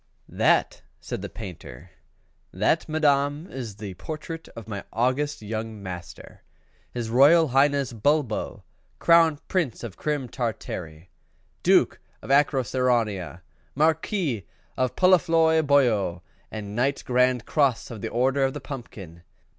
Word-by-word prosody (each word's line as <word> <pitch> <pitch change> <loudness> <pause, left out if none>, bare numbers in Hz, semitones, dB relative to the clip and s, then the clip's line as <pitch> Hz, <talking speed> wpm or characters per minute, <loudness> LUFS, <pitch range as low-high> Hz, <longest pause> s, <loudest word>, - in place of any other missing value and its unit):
"That," - - +2 0.2
said - - -6
the - - -6
Painter, 90 - -10 0.6
"that, 160 0 0
madam, 145 0 +1
is 120 -6 -6
the 100 -2 -7
portrait 160 - -7
of 115 - -9
my 100 -3 -5
august 130 +3 0
young 110 0 -5
master, 90 -2 -9 0.5
his 115 -2 -4
Royal 150 +6 +6
Highness 140 0 +2
Bulbo, 130 0 -1 0.3
Crown 165 -2 +5
Prince 170 - -1
of 110 -5 -7
Crim 145 -4 -2
Tartary, 90 - -5 0.5
Duke - - +3 0.2
of - - -5
Acroceraunia, 125 - +1 0.3
Marquis 155 - 0 0.3
of 130 -1 -1
Poluphloisboio, 160 - +3 0.3
and 105 -1 -7
Knight 135 +4 0
Grand 125 -1 +2
Cross 140 -6 +1
of 110 -4 -8
the - - -3
Order 130 +3 +1
of 135 +1 0
the - - -4
Pumpkin. 105 - -9
130 Hz, 120 wpm, -25 LUFS, 110-145 Hz, 0.6 s, Royal